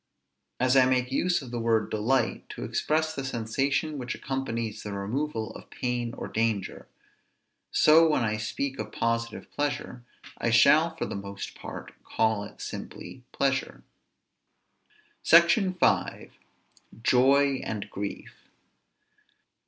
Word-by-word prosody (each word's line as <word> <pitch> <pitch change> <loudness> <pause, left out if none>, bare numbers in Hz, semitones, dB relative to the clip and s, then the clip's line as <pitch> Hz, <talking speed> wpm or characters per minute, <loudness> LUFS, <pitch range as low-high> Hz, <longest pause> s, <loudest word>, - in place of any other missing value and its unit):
As 130 +1 +3
I 130 -1 +6
make 130 0 +1
use 175 +3 +1
of 125 - -10
the 120 - -3
word 115 -1 +1
delight 115 +5 0
to - - -7
express 155 +1 0
the 135 - -4
sensation 135 +5 -1
which 125 -2 -4
accompanies 115 -5 -3
the 105 - -6
removal 110 +4 -3
of - - -12
pain 120 -1 -3
or - - -6
danger, 110 -3 -2 0.8
so, 160 +1 +6
when 150 -5 +2
I 110 -1 0
speak 135 +5 -3
of - - -5
positive 115 0 -2
pleasure, 145 -4 -3 0.4
I 115 - 0
shall 155 +8 +5
for 165 - -3
the - - -5
most 100 0 -6
part - - -9
call 110 -2 0
it - - -11
simply - - -8
pleasure. - - -1 1.4
SECTION 180 +3 +5
V. - - +1 0.7
JOY 135 +2 +4
AND 105 -2 -4
GRIEF. 100 0 -6
125 Hz, 130 wpm, -27 LUFS, 110-140 Hz, 1.4 s, I